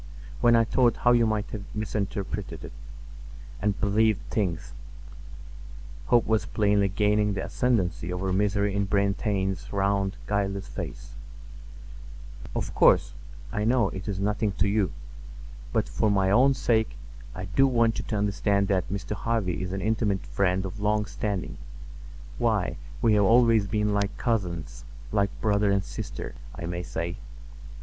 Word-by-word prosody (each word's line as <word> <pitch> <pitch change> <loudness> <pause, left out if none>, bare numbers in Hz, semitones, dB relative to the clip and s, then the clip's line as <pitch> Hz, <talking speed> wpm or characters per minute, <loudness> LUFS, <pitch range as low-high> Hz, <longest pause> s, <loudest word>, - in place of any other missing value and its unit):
When 120 -1 +5
I 115 - +5
thought 120 +1 +2
how 120 - +3
you 120 -2 +4
might 110 -1 -1
have 105 - -5
misinterpreted 100 -2 -3
it, - - -9 0.9
and 105 -1 0
believed 110 +1 +2
things"—hope - - -4
was 110 -1 +1
plainly 100 -2 +2
gaining 105 0 +2
the 95 - -3
ascendancy 90 -9 0
over 90 +1 -2
misery 100 +1 +1
in 100 0 0
Brantain's 100 -2 0
round, 100 -1 0
guileless 100 -1 -1
face—"Of - - -9
course, - - +4 0.4
I 105 - -1
know 115 -2 +3
it 95 +1 -7
is 100 -3 -2
nothing 105 +1 0
to 95 +1 +1
you, 100 -1 +1 0.8
but - - +1
for 110 - 0
my 95 -2 +2
own 130 +6 +5
sake 110 -4 +1 0.4
I 90 - -5
do 120 +9 +3
want 115 -3 +2
you 110 - -4
to - - -2
understand 100 -1 +1
that 95 -3 +1
Mr. 100 +1 -5
Harvy 100 -6 -1
is 95 -1 -3
an 95 0 -3
intimate 105 -3 0
friend 95 -1 0
of 95 +3 -6
long 105 0 +1
standing. 100 -2 -4 0.8
Why, - - +1 0.3
we 115 -2 +5
have 105 -1 +4
always 115 -1 +5
been 105 0 0
like 100 0 -1
cousins—like 85 - -2
brother 105 -1 +2
and 100 -1 +1
sister, - - -6 0.2
I - - -6
may 85 +1 -3
say. 85 0 -4
100 Hz, 140 wpm, -27 LUFS, 95-110 Hz, 0.9 s, When